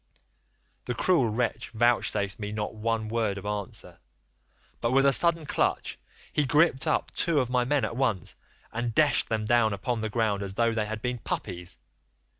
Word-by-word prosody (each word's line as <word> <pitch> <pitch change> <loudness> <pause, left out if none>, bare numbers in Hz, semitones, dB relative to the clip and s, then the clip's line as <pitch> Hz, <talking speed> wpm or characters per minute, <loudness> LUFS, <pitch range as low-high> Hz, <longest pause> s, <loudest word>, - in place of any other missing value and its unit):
"The 125 - -2
cruel 165 -7 +3
wretch 120 +3 -2
vouchsafed 110 -3 +1
me 105 -1 -4
not 105 0 -3
one 110 0 -1
word 110 -3 -1
of 100 - -8
answer, 105 -1 -5 0.8
but 120 +1 0
with 135 +1 +4
a 140 - +5
sudden 165 +1 +3
clutch - - -1 0.3
he 150 - +2
gripped 145 -1 +3
up - - 0
two 165 -4 +1
of 125 -2 -1
my 125 -1 +2
men 145 +1 +1
at - - -5
once 115 -9 -1 0.4
and 120 0 -2
dashed 150 -2 +3
them 110 -1 -1
down 110 -1 +3
upon 115 +3 -2
the 110 - -2
ground 110 -3 0
as 100 -1 -5
though 115 0 +2
they 110 -2 -1
had 110 0 -5
been 125 -1 -2
puppies. 90 -5 -4
115 Hz, 180 wpm, -27 LUFS, 105-125 Hz, 0.8 s, a